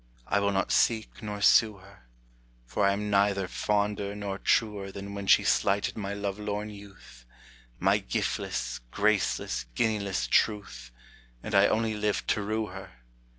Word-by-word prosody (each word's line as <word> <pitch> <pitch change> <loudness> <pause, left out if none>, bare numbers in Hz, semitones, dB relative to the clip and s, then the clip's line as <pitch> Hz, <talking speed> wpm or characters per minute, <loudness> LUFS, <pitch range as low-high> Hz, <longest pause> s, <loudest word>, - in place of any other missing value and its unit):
I 100 - +1
will 100 0 +1
not 95 0 0
seek 110 -2 +1
nor 105 -2 -5
sue 110 0 +5
her, 95 -10 -18 0.6
For 100 +11 +1
I'm 105 +1 -1
neither 100 -1 +2
fonder 100 +1 -1
nor 100 -1 -4
truer 105 -3 0
Than 100 +1 -7
when 100 -1 -6
she - - +6
slighted 100 0 +1
my 100 -2 -4
lovelorn 105 +1 -3
youth, 100 -12 -14 0.5
My - - +3
giftless, 60 0 -2
graceless, 105 - 0
guinealess 100 - 0
truth, 100 - 0 0.5
And 105 - -6
I 100 +1 +6
only 110 0 0
lived 105 -1 -1
to 105 - +1
rue 110 +2 -1
her. 95 0 -10
100 Hz, 145 wpm, -28 LUFS, 100-105 Hz, 0.6 s, she